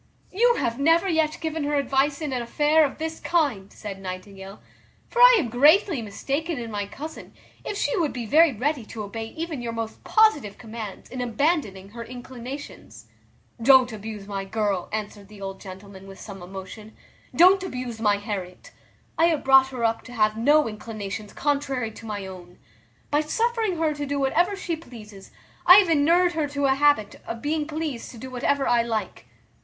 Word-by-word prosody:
"You 475 Hz, +5 st, +3 dB
have 235 Hz, -, -2 dB
never 330 Hz, +6 st, +3 dB
yet 320 Hz, -3 st, +1 dB
given 320 Hz, -1 st, -2 dB
her 295 Hz, 0 st, 0 dB
advice 280 Hz, +2 st, +1 dB
in 295 Hz, -3 st, -3 dB
an 250 Hz, -, -1 dB
affair 295 Hz, +6 st, +3 dB
of 275 Hz, -, -5 dB
this 320 Hz, +1 st, -4 dB
kind," 275 Hz, -, 0 dB
said 195 Hz, -2 st, -8 dB
Nightingale; 190 Hz, +1 st, -8 dB, 0.5 s
"for 480 Hz, -, -4 dB
I -, -, +9 dB
am 290 Hz, -, -1 dB
greatly 295 Hz, -, +4 dB
mistaken 275 Hz, +10 st, -3 dB
in 230 Hz, -2 st, -6 dB
my 205 Hz, -1 st, -3 dB
cousin, 300 Hz, +9 st, -9 dB, 0.3 s
if 405 Hz, -, -4 dB
she -, -, 0 dB
would 330 Hz, -7 st, 0 dB
be 245 Hz, -2 st, -5 dB
very 315 Hz, +7 st, +5 dB
ready 265 Hz, +3 st, -1 dB
to 215 Hz, -, -6 dB
obey 225 Hz, +2 st, -6 dB
even 320 Hz, 0 st, -5 dB
your 235 Hz, -1 st, -4 dB
most 225 Hz, -1 st, -5 dB
positive 295 Hz, -, +3 dB
commands 220 Hz, -3 st, -8 dB
in 255 Hz, 0 st, -4 dB
abandoning 240 Hz, -, -1 dB
her 230 Hz, +2 st, -8 dB
inclinations." 250 Hz, +3 st, -9 dB, 0.5 s
"Don't 255 Hz, 0 st, +6 dB
abuse 215 Hz, -1 st, -7 dB
my 195 Hz, -1 st, -4 dB
girl," 200 Hz, -2 st, -2 dB
answered 210 Hz, -1 st, -5 dB
the 210 Hz, 0 st, -14 dB
old 195 Hz, -1 st, -7 dB
gentleman 190 Hz, 0 st, -11 dB
with 195 Hz, 0 st, -12 dB
some 195 Hz, -3 st, -9 dB
emotion; 190 Hz, +4 st, -10 dB, 0.4 s
"don't 370 Hz, +3 st, +6 dB
abuse 250 Hz, -10 st, -5 dB
my 205 Hz, -2 st, +3 dB
Harriet. 195 Hz, -3 st, -6 dB, 0.5 s
I 330 Hz, -, +6 dB
have 325 Hz, -4 st, +1 dB
brought 270 Hz, 0 st, +6 dB
her 255 Hz, -3 st, -5 dB
up 225 Hz, 0 st, +1 dB
to 250 Hz, -, -10 dB
have 215 Hz, -2 st, +2 dB
no 290 Hz, +6 st, +4 dB
inclinations 215 Hz, -1 st, -6 dB
contrary 275 Hz, -5 st, -1 dB
to 225 Hz, +1 st, -11 dB
my 205 Hz, -2 st, -4 dB
own. 180 Hz, -2 st, -11 dB, 0.5 s
By 295 Hz, +1 st, +3 dB
suffering 445 Hz, +3 st, 0 dB
her 320 Hz, -1 st, +1 dB
to 290 Hz, -1 st, -5 dB
do 285 Hz, +1 st, -2 dB
whatever 345 Hz, +9 st, +2 dB
she 355 Hz, -3 st, -3 dB
pleases, 215 Hz, -10 st, -13 dB, 0.4 s
I 360 Hz, -, +11 dB
have 390 Hz, -3 st, +6 dB
enured 335 Hz, +4 st, +4 dB
her 315 Hz, -3 st, -1 dB
to 285 Hz, 0 st, -2 dB
a 265 Hz, -, +4 dB
habit 280 Hz, -7 st, +2 dB
of 230 Hz, 0 st, -6 dB
being 300 Hz, 0 st, -1 dB
pleased 305 Hz, -6 st, -4 dB
to 240 Hz, -, -11 dB
do 260 Hz, +3 st, -8 dB
whatever 270 Hz, +2 st, 0 dB
I 240 Hz, -1 st, +4 dB
like." 225 Hz, -2 st, -4 dB
250 Hz, 185 wpm, -24 LUFS, 215-310 Hz, 0.5 s, I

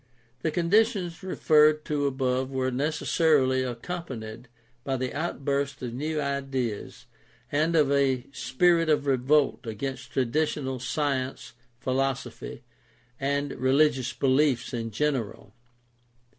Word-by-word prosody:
— 120 Hz, +2 st, -38 dB
The 160 Hz, -, 0 dB
conditions 180 Hz, +1 st, +1 dB
referred 155 Hz, -4 st, +3 dB
to 145 Hz, -2 st, 0 dB
above 130 Hz, -1 st, 0 dB
were 130 Hz, -1 st, -1 dB
necessarily 145 Hz, -1 st, +2 dB
accompanied 125 Hz, -3 st, -6 dB, 0.4 s
by 135 Hz, +1 st, -1 dB
the 130 Hz, 0 st, -3 dB
out 150 Hz, -2 st, -4 dB
burst 140 Hz, 0 st, 0 dB
of 120 Hz, -2 st, -4 dB
new 155 Hz, +4 st, -2 dB
ideas 135 Hz, -6 st, -3 dB, 0.5 s
and 155 Hz, +3 st, +1 dB
of 150 Hz, -3 st, +4 dB
a 135 Hz, -3 st, +2 dB
spirit 165 Hz, +7 st, +2 dB
of 145 Hz, -2 st, +2 dB
revolt 135 Hz, 0 st, +2 dB
against 130 Hz, +3 st, -5 dB
traditional 130 Hz, 0 st, 0 dB
science, 135 Hz, 0 st, -2 dB, 0.3 s
philosophy, 130 Hz, -2 st, -3 dB, 0.6 s
and 140 Hz, +1 st, -1 dB
rehgious 130 Hz, -1 st, +2 dB
beliefs 135 Hz, -2 st, +2 dB
in 115 Hz, -1 st, -3 dB
general. 115 Hz, -5 st, -2 dB
135 Hz, 115 wpm, -27 LUFS, 130-150 Hz, 0.6 s, of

